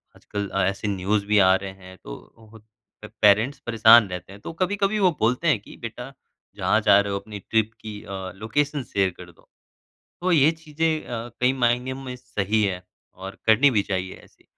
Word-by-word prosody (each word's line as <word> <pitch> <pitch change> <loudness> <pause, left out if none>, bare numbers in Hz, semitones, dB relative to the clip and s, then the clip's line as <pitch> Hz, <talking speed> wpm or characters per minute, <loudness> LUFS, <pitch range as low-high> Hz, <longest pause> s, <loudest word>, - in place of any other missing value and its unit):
आजकल 100 -1 -6 0.2
ऐसे 100 +2 -2
न्यूज़ 100 +1 -1
भी 105 0 +3
आ 95 -1 +6
रहे 95 0 -5
हैं 95 0 -13
तो 110 - -13 0.6
पेरेंट्स 110 +7 +4
परेशान 115 -1 +6
रहते 90 +1 -7
हैं 100 - -13
तो - - -7
कभी-कभी 200 +2 0
वो 185 -2 +4
बोलते 125 +9 +1
हैं 140 -10 +3
कि - - -14
बेटा 120 +3 -7 0.4
जहाँ - - +1
जा 100 - +5
रहे 100 0 -1
हो 100 - -1
अपनी 105 0 -9
ट्रिप 110 +2 0
की 105 -1 -8
अ, 95 -1 -6
लोकेशन 140 +7 -2
शेयर 95 -4 0
कर 90 -1 -12
दो। 85 - -27 0.7
तो 185 +1 0
ये 155 -2 +5
चीज़ें 160 0 -2
अ, 120 0 -5
कई 125 +1 +3
मायने 125 0 0
में 130 -1 -7
सही 110 -4 -1
है 90 -3 -1 0.3
और 95 +1 -9
करनी 130 +6 +5
भी 105 -4 +1
चाहिए 95 -2 -4
ऐसे। - - -26
110 Hz, 185 wpm, -23 LUFS, 100-130 Hz, 0.7 s, आ